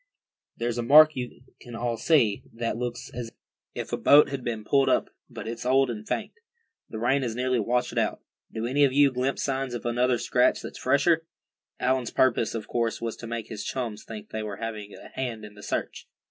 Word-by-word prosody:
"There's 120 0 -2
a - - +1
mark 155 +6 +7
you 125 -1 -6 0.2
can 120 -1 -10
all 120 0 -1
see, 115 -4 +3
that 115 -1 -2
looks 120 +2 -5
as 120 -1 -5 0.5
if - - -5
a - - +1
boat 145 +1 +6
had 140 -2 -4
been 115 -3 -3
pulled 135 +2 +3
up, - - +1 0.2
but - - -8
it's 115 0 -5
old 130 0 +3
and 110 -2 -7
faint. - - -2 0.6
The 110 - -6
rain 125 +5 +2
has 120 -4 -2
nearly 125 0 +1
washed 120 +3 0
it - - -1
out. - - 0 0.3
Do 110 0 -3
any 140 +4 +2
of 135 -2 +4
you 140 0 +5
glimpse 130 +2 -1
signs 135 -2 -2
of 120 - -6
another 120 +1 +2
scratch - - +2
that's - - -8
fresher?" 165 +3 +2 0.5
Allan's 125 -2 +1
purpose, 115 -3 +2
of 110 - -5
course, 115 -1 -1
was 115 -1 -3
to 115 - -8
make 115 -1 -5
his 110 -3 -5
chums 115 -5 -4
think 110 -2 -9
they 110 - -3
were 105 -2 -5
having 110 -2 -5
a - - -12
hand 120 -5 -4
in 105 - -12
the 105 - -13
search. - - -4
120 Hz, 215 wpm, -26 LUFS, 115-130 Hz, 0.6 s, mark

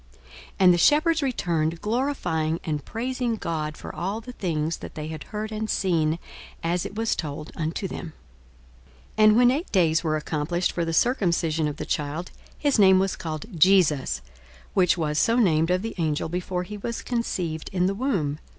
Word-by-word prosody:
42:002:020 - - -27 0.4
And 180 -1 +8
the - - +2
shepherds 310 - +4
returned, 170 - 0
glorifying 180 - -1
and 150 -3 -2
praising 245 0 -2
God 155 -6 -3
for - - -8
all 195 +5 -3
the 230 +2 -9
things 165 -7 -2
that - - -10
they 155 0 -5
had 160 -1 -7
heard 215 0 -5
and 215 0 -3
seen, 165 -4 +1 0.5
as 170 +1 0
it - - -12
was 225 +1 0
told 150 0 -5
unto 165 +4 -2
them. - - -6
42:002:021 160 - -9 1.1
And 215 - +6
when 245 0 +6
eight 300 +7 -2
days 165 -4 +3
were 155 -2 +1
accomplished 155 +3 -1
for 170 - -1
the 165 - -2
circumcising 165 -6 +1
of 145 - -6
the - - -4
child, 150 +4 -3 0.3
his 285 -6 +1
name 190 -2 +7
was 190 0 +1
called 155 -3 -5
JESUS, 150 - +4 0.5
which 180 -2 +3
was 150 -2 0
so 230 - +3
named 165 -9 +3
of 180 +2 +1
the 225 - -4
angel 155 -2 0
before 180 +1 -2
he 210 +3 -7
was 235 +3 -4
conceived 180 -10 -2
in 180 -1 +1
the 195 - +1
womb. 195 - -1
175 Hz, 185 wpm, -25 LUFS, 155-215 Hz, 1.1 s, And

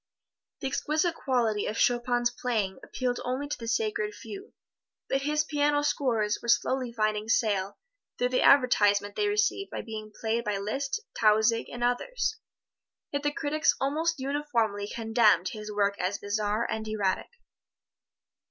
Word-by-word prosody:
The 270 - -1
exquisite 310 +5 0
quality 235 -9 0
of 215 - -3
Chopin's 240 0 +2
playing 220 -6 -2
appealed 250 -1 -2
only 260 +3 -2
to 295 - -2
the 230 - -8
sacred 425 - -1
few, 400 +1 -10 0.5
but 270 - 0
his 300 +2 +1
piano 290 -1 +1
scores 230 -8 +1
were - - -8
slowly 255 +1 +2
finding 215 -1 -1
sale, 205 -4 +1 0.4
through 245 - +1
the 255 - +1
advertisement 205 -7 +4
they 415 - +1
received 410 -1 +1
by - - -5
being 215 -2 -7
played 230 +1 0
by 210 -1 -1
Liszt, 270 - -2
Tausig 220 +1 +3
and 240 0 -5
others. 440 - 0 0.7
Yet 285 - -1
the 290 0 0
critics 305 +1 +1
almost 315 +5 0
uniformly 250 -7 -1
condemned 220 -5 +3
his 210 +1 -7
work 200 -1 0
as 185 +3 -1
bizarre 210 +2 -1
and 220 0 -4
erratic. 205 -3 -1
240 Hz, 145 wpm, -28 LUFS, 215-290 Hz, 0.7 s, advertisement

